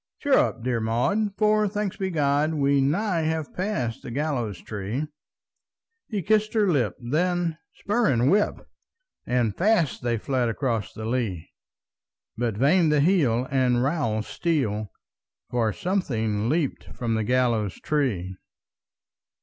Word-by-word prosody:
"Cheer 285 -2 0
up, 115 - +1
dear 125 -2 0
Maud, 190 - 0
for, 215 0 +3
thanked 205 0 -3
be 190 -1 -1
God, 150 -1 +1
We 140 -1 +3
nigh 170 +6 +1
have 160 -1 -2
passed 155 - -2
the - - -8
gallows 120 - -2
tree!" 105 +9 -4 1.0
He 205 -5 -3
kissed 215 +3 +1
her 210 -2 +3
lip; 125 - +1
then 165 +5 0 0.2
spur 210 +1 +1
and 120 0 +2
whip! 210 +2 +1 0.6
And 120 -4 +1
fast 180 - +2
they 120 -1 0
fled 125 +1 0
across 115 -3 -2
the 110 - -7
lea! 110 -8 -2 0.8
But 115 -3 -2
vain 155 - +4
the 150 -1 +3
heel 140 -8 +2
and 125 -2 +2
rowel 135 -7 0
steel, 110 - -1 0.6
For 115 -3 +1
something 115 - -1
leaped 155 -2 -1
from 115 -2 -2
the 110 -1 0
gallows 115 -5 +1
tree! 105 -12 -1
135 Hz, 135 wpm, -25 LUFS, 115-175 Hz, 1.0 s, vain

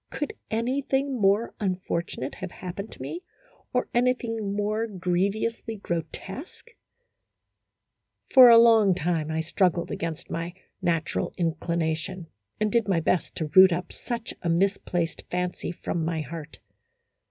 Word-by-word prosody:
Could 295 - -4 0.2
anything 265 +2 0
more 200 +4 +3
unfortunate 180 - -2
have 190 -1 -6
happened 190 +4 -7
to - - -12
me, 345 - -5 0.5
or 250 - 0
anything 235 -4 0
more 215 +2 0
grievously 200 +4 -1
grotesque? 195 - -6 1.6
For 255 -2 +10
a 230 - +9
long 225 -5 +6
time 165 -3 -1
I 160 0 0
struggled 170 +1 +1
against 165 -2 -4
my 165 +2 -4 0.3
natural 165 -2 -1
in 165 -3 +1
clination, 165 +2 -2 0.3
and 215 -1 +1
did 230 -1 +2
my 185 -4 +2
best 170 +2 0
to 155 -2 -3
root 190 0 +9
up 175 +1 -2
such 235 -2 -5
a 170 - -1
mis 195 +4 +2
placed 170 -2 -2
fancy 180 -1 -2
from 170 -1 -3
my 160 -1 -1
heart. 155 +1 -8
185 Hz, 135 wpm, -26 LUFS, 170-225 Hz, 1.6 s, For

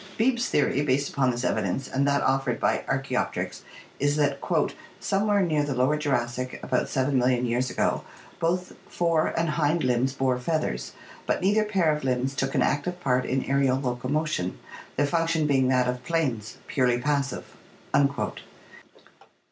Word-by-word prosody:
Beebe's 240 +1 +2
theory 140 -1 +2
based 140 0 +1
upon 135 -2 +1
this 120 0 -2
evidence 110 +5 -1
and 140 +1 0
that 140 0 +2
offered 135 -2 +1
by - - +1
Archaopteryx - - -2 0.4
is 145 +1 +2
that 145 -2 +1 0.6
"somewhere 200 +1 +2
near 155 -4 +1
the 145 -2 -2
lower 130 +4 +2
Jurassic, 125 -4 -2
about - - 0
seven 130 0 +1
million 125 0 +2
years 125 +2 0
ago, - - 0 0.4
both 180 +2 -1
fore 165 -2 +1
and 165 0 +1
hind 155 +1 +1
limbs 130 +1 +1
bore 130 -2 0
feathers; 125 - -2 0.3
but - - +1
neither 205 +4 +3
pair 190 -7 +2
of 150 - -6
limbs 130 +1 0
took 135 +1 -1
an - - +3
active 175 +5 -1
part 125 -5 +1
in 130 0 0
aerial 135 -1 +2
locomotion, 130 - -1 0.4
their 145 - +2
function 165 +1 +1
being 135 -3 +3
that 125 -1 +3
of 125 0 -2
planes, 130 -9 -1
purely 125 -3 +2
passive." 140 0 -1
140 Hz, 155 wpm, -26 LUFS, 125-155 Hz, 0.6 s, neither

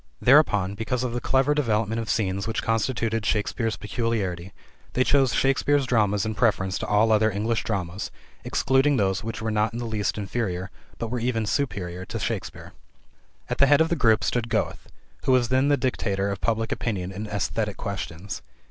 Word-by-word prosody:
Thereupon, 105 -9 +4
because 115 +4 -2
of 125 -2 -2
the 120 - -2
clever 135 +2 +2
development 115 -5 0
of 115 - -6
scenes 100 -2 0
which 115 - -2
constituted 115 0 0
Shakespeare's 110 +2 0
peculiarity, 100 -5 -2 0.4
they 130 - +3
chose 135 -2 +3
Shakespeare's 135 +1 +2
dramas 105 -5 +2
in 110 - -2
preference 100 -4 +1
to - - -4
all 105 +2 +3
other 110 0 +4
English 110 +3 -1
dramas, 95 -2 -3 0.3
excluding 135 +2 +2
those 95 -1 +1
which 110 0 -5
were 110 - -1
not 105 +1 +1
in - - -4
the 120 - -3
least 110 -3 -1
inferior, 95 -3 -3 0.3
but 115 - -4
were 125 - -1
even 115 -2 0
superior, 95 -8 -2
to - - -5
Shakespeare. - - -4 0.7
At - - -3
the 140 - +6
head 145 +1 +5
of 160 0 +3
the 170 - +1
group 110 -7 +3
stood 120 -1 -1
Goethe, 110 -2 -2 0.4
who 130 - +4
was 120 -2 +3
then 130 +2 +3
the 145 0 +3
dictator 100 -6 -1
of 100 - -5
public 115 -1 0
opinion 95 -5 -2
in 105 +3 -6
esthetic 105 +1 -2
questions. 95 -1 -5
110 Hz, 185 wpm, -25 LUFS, 100-125 Hz, 0.7 s, the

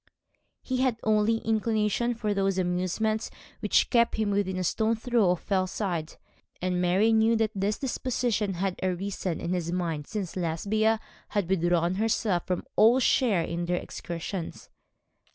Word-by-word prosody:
He 255 - -2
had 255 -3 +1
only 215 +1 +3
inclination 220 +1 +1
for 215 -2 -1
those 195 -1 0
amusements 185 +5 0 0.3
which - - +2
kept 235 -2 +3
him 215 -2 0
within 195 -2 0
a 185 - -1
stone's 220 +5 0
throw 240 -7 +2
of 180 -1 0
Fellside: 185 -4 -2 0.4
and 180 0 -1
Mary 190 +6 +3
knew 225 +1 +4
that 220 -1 +1
this 200 +2 -1
disposition 240 -6 -1
had 185 +1 -2
arisen 185 -1 -2
in 170 +1 -2
his 170 -2 -2
mind 165 -5 -2
since 200 -5 -4
Lesbia 205 +6 +1 0.3
had 205 -4 -1
withdrawn 175 -1 +2
herself 215 -5 0
from 180 -1 -2
all 235 +4 +6
share 230 -8 +3
in 170 +1 -3
their 180 +1 0
excursions. 170 +1 -6
200 Hz, 150 wpm, -27 LUFS, 180-220 Hz, 0.4 s, all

